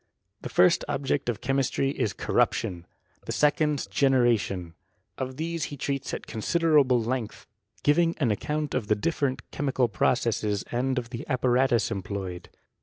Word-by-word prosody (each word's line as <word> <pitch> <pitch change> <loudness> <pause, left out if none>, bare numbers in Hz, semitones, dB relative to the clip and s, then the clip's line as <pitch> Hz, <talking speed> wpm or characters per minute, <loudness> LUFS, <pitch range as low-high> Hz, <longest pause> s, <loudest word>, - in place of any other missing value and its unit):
The - - -6
first 90 - +4
object 140 -2 -1
of 110 -5 -3
chemistry 135 +1 0
is 110 - -1
corruption, 85 -1 0 0.4
the - - -2
se 150 0 +4
cond 150 -2 -1
generation. 115 -10 +2 0.5
Of 130 0 -4
these 165 +1 -2
be 145 - -7
treats 140 0 -3
at - - -5
considerable 145 +1 +2
length, 115 0 -3 0.4
giving 165 +3 +3
an 130 -8 +1
account 150 +8 -2
of 105 - -1
the 105 - +3
different 135 +3 -2
chemical 135 -3 0
processes, 105 0 0
and 130 +2 0
of 120 -1 -3
the 120 - -5
apparatus 125 -3 +2
employed. 95 -2 -5
130 Hz, 145 wpm, -27 LUFS, 110-145 Hz, 0.5 s, first